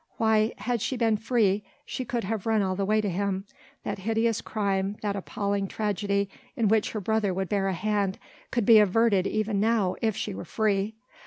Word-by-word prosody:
Why! 220 0 +3
had 245 -3 -2
she 260 - -1
been 225 -2 +2
free 210 -3 +1 0.2
she 255 - -4
could 240 0 -2
have 215 +1 -3
run 220 -2 +3
all 185 -1 -1
the 195 +1 -1
way 215 +2 +2
to 210 - -2
him 195 +1 -1 0.4
that - - -4
hideous 225 +2 0
crime, 200 -1 -1
that 205 -1 -1
appalling 200 0 -2
tragedy 200 -1 -1 0.3
in 230 -6 +2
which 220 -1 +2
her 215 - -2
brother 210 -2 0
would 190 -1 -2
bear 200 -2 +1
a 190 - 0
hand, 205 0 0 0.3
could 235 -4 0
be 225 0 +8
averted 205 -1 +3
even 215 -1 0
now 215 -3 +2
if 220 -2 0
she 210 - -3
were - - -6
free! 210 +2 0
210 Hz, 195 wpm, -27 LUFS, 195-220 Hz, 0.4 s, be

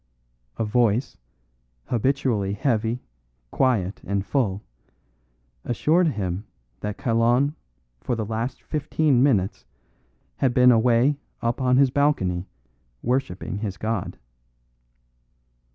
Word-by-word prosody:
A 115 - 0
voice, 115 +2 +1 0.7
habitually 120 -5 0
heavy, 115 0 -1 0.5
quiet 110 -8 +1
and 100 0 -2
full, 105 -8 0 1.0
assured 165 +8 +2
him 100 - -2 0.4
that 105 0 -4
Kalon 120 +3 +2 0.5
for 120 - -2
the 110 -2 -3
last 115 +4 -4
fifteen 150 -3 +1
minutes 105 -9 +2 0.7
had 130 -3 +1
been 125 0 +7
away 120 +4 +3 0.3
up 115 +3 -1
on 125 0 +3
his 135 -1 +4
balcony 95 -12 +1 0.6
worshipping 115 -6 -2
his 100 -3 -4
god. 110 -2 -3
120 Hz, 100 wpm, -24 LUFS, 105-135 Hz, 1.0 s, been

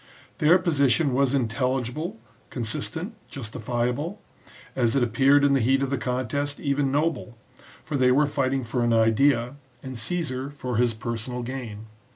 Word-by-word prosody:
Their 160 +4 +6
position 145 -5 +2
was 135 +1 +2
intelli 125 +1 0
gible, 155 - -5 0.3
consistent, 160 - -3 0.2
justifiable; 125 - -3 0.6
as 120 -2 +2
it 135 - +3
appeared 135 +5 +4
in 140 -1 +4
the 135 - +3
heat 135 +3 +2
of 135 - -2
the 140 - +1
contest, 130 +3 -2
even 140 -1 0
noble, 145 -5 -1 0.5
for 155 - -4
they 130 -2 +4
were 145 +4 +4
fighting 135 -2 0
for 120 +1 -1
an 120 -1 +2
idea, 120 +3 +3 0.3
and 130 -1 -6
Caesar 135 +1 -2
for 130 -5 -4
his 120 -2 +2
personal 120 +2 -4
gain. 120 -4 -6
130 Hz, 155 wpm, -25 LUFS, 120-145 Hz, 0.6 s, Their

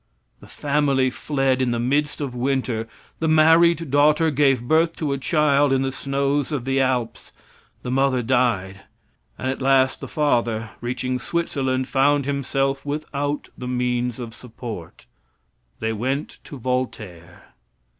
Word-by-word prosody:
The - - -15
family 140 -3 +1
fled 135 -1 0
in 130 - +1
the 120 -1 -1
midst 145 +5 0
of 135 -3 -3
winter; 125 -3 -1 0.3
the 160 - 0
married 165 0 +4
daughter 150 +3 +4
gave 135 -4 +2
birth 165 +3 +3
to 150 -3 -2
a - - -2
child 145 -1 +2
in 135 0 +2
the 135 - -1
snows 140 +2 -1
of 135 -5 -3
the 135 0 +1
Alps; 125 -3 -2 0.5
the 125 - -4
mother 130 -1 +2
died, 115 -6 0 0.6
and 130 - -2
at 135 - -6
last 130 -1 +3
the - - -7
father, 115 -7 0
reaching 125 +1 -2
Switzerland, 130 -4 -1
found 140 +1 +2
himself 135 0 -1
without 145 0 -3
the 125 - -7
means 125 -1 -1
of 115 -2 -6
support. 115 - -9 0.7
They 110 0 -1
went 130 +7 -3
to 145 - -9
Voltaire. 110 -9 -5
135 Hz, 145 wpm, -22 LUFS, 125-145 Hz, 0.7 s, married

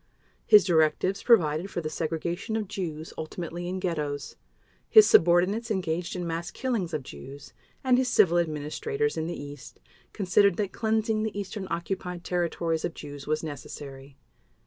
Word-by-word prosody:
His 210 -3 +8
directives 175 +2 +2
provided 170 -6 +3
for 175 - -3
the 160 - -3
segregation 170 +7 -3
of 215 -2 -2
Jews, 165 -5 -5
ultimately 170 +2 -5
in 185 +1 -3
ghettos. 150 -5 -3 0.5
His 435 -1 +8
subordinates 180 +7 +4
engaged 180 -4 -2
in 180 -1 -3
mass 165 +1 -3
killings 230 -10 -2
of 155 -4 -3
Jews, 135 - -11 0.3
and 255 -1 +4
his 260 - +1
civil 175 -7 +4
administrators 170 - -2
in 160 - -2
the 175 - -5
East 145 -3 -10 0.3
considered 200 -1 +3
that 205 -3 -2
cleansing 220 -1 0
the 215 -2 -3
Eastern 200 0 -5
Occupied 180 0 -4
Territories 170 -2 -1
of 165 - -3
Jews 145 -1 -9
was 155 +1 0
necessary. 140 -2 -8
175 Hz, 150 wpm, -27 LUFS, 155-205 Hz, 0.5 s, His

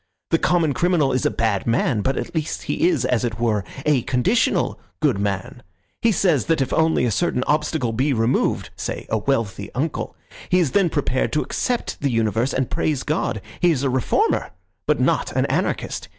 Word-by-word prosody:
The 165 - +4
common 170 -5 +2
criminal 165 -1 +2
is 130 - +1
a - - +2
bad 110 -3 -1
man, 115 -1 +1
but 130 +4 0
at - - -4
least 160 -2 -3
he 175 - +1
is, 145 -8 0
as 125 -2 +1
it 115 -2 -2
were, 110 -4 +1 0.2
a 145 -4 +3
conditional 130 - +1 0.2
good 140 -10 +2
man. 100 +4 -3 0.4
He 230 - +4
says 170 - +2
that 165 -2 +2
if 135 - -1
only 160 -5 +3
a 120 - +1
certain 120 +4 0
obstacle 150 -5 0
be 135 +6 +1
removed—say 115 +1 -1
a 110 - +2
wealthy 105 -5 -1
uncle—he 155 +5 -3
is 160 -7 +1
then 195 -4 +3
prepared 140 -4 0
to 150 - +1
accept 245 -2 -2
the 140 - +1
universe 115 +2 +1
and 130 -1 0
to - - -9
praise 150 -4 0
God. 155 - -1 0.2
He 175 - +4
is 145 -5 +1
a 135 - +1
reformer, 130 - +1 0.4
but - - +2
not - - +1
an - - +1
anarchist. - - -2
135 Hz, 190 wpm, -22 LUFS, 115-160 Hz, 0.4 s, The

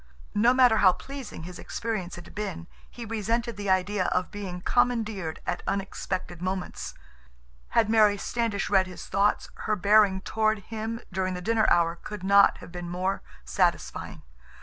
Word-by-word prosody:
No 230 +4 +4
matter 250 -3 +5
how 185 -2 +6
pleasing 270 - -8
his 180 +1 -8
experience 215 -6 -4
had 175 0 -11
been, 190 -5 -4 0.2
he 240 - -8
resented 230 +2 -1
the 205 -1 -4
idea 185 +1 +2
of 180 0 0
being 190 -4 -6
commandeered 220 -8 0
at - - -2
unexpected 190 -3 -3
moments. 185 0 -4 0.8
Had 220 - +5
Mary 215 -2 +5
Standish 225 -1 -1
read 190 -2 +3
his 180 - -9
thoughts, 200 +1 +1 0.2
her 215 - +3
bearing 200 -1 +4
toward 215 +2 +1
him 225 +3 -5
during 185 0 -1
the - - -4
dinner 220 +4 +2
hour 170 -1 +3
could 210 +1 -8
not 200 +1 +6
have - - -12
been 175 -1 -6
more 185 +2 -1 0.2
satisfying. - - -1
200 Hz, 155 wpm, -27 LUFS, 185-220 Hz, 0.8 s, how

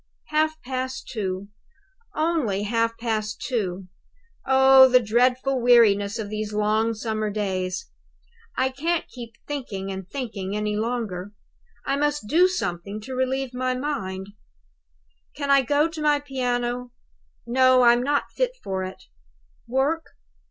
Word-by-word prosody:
"Half 310 +1 +1
past 260 0 -4
two 195 -2 -4 0.7
only 305 - 0
half 230 +1 0
past 215 -2 -2
two. 195 -7 -3 0.6
Oh, 265 0 +7
the 250 0 +6
dreadful 250 +3 +1
weariness 210 -4 +4
of 220 -2 -4
these 215 0 -4
long 215 +2 +1
summer 215 -1 -2
days! 190 -3 -2 0.7
I 260 0 +2
can't 320 +6 -1
keep 235 -2 -9
thinking 215 -10 -4
and 190 -1 -7
thinking 210 -8 -4
any 210 0 -1
longer; 215 -4 -3 0.5
I 275 - 0
must 295 -3 0
do 345 +10 +5
something 200 - -3
to 260 +5 -7
relieve 260 0 -1
my 255 0 -1
mind. 195 -9 -4 1.1
Can 280 -1 -1
I 275 0 +6
go 290 +4 +2
to 325 -1 -7
my 295 -1 +3
piano? 245 -3 -2 0.5
No; 255 +1 +4
I'm 240 0 +5
not 285 +2 0
fit - - -1
for 190 -1 -2
it. 185 0 -8 0.6
Work? 275 +7 0
245 Hz, 130 wpm, -24 LUFS, 210-270 Hz, 1.1 s, Oh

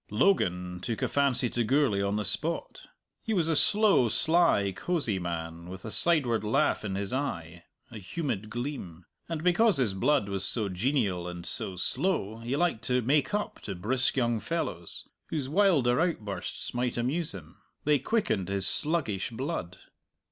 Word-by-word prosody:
Logan 90 - +1
took 110 +4 -4
a - - +2
fancy 140 -3 +1
to 120 0 -1
Gourlay 125 -4 +2
on 100 +1 0
the 105 0 -1
spot. 165 +2 -3 0.3
He 225 - -2
was 170 -4 +1
a 165 - +2
slow, 205 - +4
sly, 160 - +3
cosy 140 - -1
man, 85 -1 -5
with 95 +2 -9
a 110 - -5
sideward 120 - +4
laugh 135 +7 +1
in 100 -3 -3
his 100 +3 -3
eye, 90 - -4 0.3
a 110 - -8
humid 110 - -4
gleam. 110 - -6 0.2
And 165 -2 -3
because 185 +2 +4
his 120 -7 +1
blood 120 +4 +2
was 100 -1 -3
so 105 +1 -1
genial 95 -3 0
and 90 -1 -7
so 95 - -3
slow, 110 - -1
he 120 +4 -3
liked 165 -8 0
to 125 -1 +1
make 145 - +2
up 210 - -3
to - - -5
brisk 125 +10 0
young 120 -3 +1
fellows, 95 - -4 0.2
whose 145 -5 -3
wilder 155 -7 +3
outbursts 110 - -3
might 125 0 -1
amuse 145 +7 -1
him. 80 -5 -11 0.3
They 150 -1 +3
quickened 130 - 0
his 100 -1 +2
sluggish 140 - 0
blood. 115 - -4
120 Hz, 165 wpm, -28 LUFS, 95-150 Hz, 0.3 s, slow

